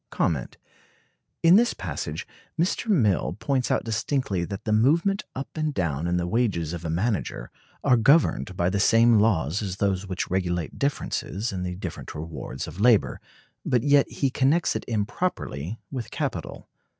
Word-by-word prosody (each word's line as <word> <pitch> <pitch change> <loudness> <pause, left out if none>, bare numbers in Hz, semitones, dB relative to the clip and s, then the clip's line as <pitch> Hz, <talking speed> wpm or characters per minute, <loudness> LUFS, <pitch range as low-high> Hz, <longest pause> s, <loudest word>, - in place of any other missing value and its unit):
In 170 +3 +8
this 235 +1 +3
passage 75 -4 -4 0.3
Mr. 180 +6 0
Mill 115 - +2
points 135 -3 0
out - - +1
distinctly 115 -4 -1
that 100 +2 -6
the 110 - -2
movement 165 - +2
up 135 - -5
and 155 -1 -1
down 85 -3 -1
in 90 0 +1
the 90 - -1
wages 90 -6 0
of 85 -1 -6
a 85 - -3
manager 95 - -2 0.3
are 125 - +4
governed 115 - +3
by 85 +1 +1
the 100 - 0
same 115 +2 +5
laws 95 - +1
as 95 -3 -3
those 100 -1 0
which 90 -2 -3
regulate 90 -3 -2
differences 120 -6 -2
in 95 -2 -4
the 90 0 -3
different 90 -2 -7
rewards 75 -4 -6
of 95 - -7
labor, 115 -2 +3 0.4
but 120 -2 +1
yet 145 -1 +4
he 135 -2 -1
connects 140 +6 +2
it - - -2
improperly 105 - -2
with 125 -5 -5
capital. - - -4
105 Hz, 160 wpm, -25 LUFS, 90-130 Hz, 0.4 s, In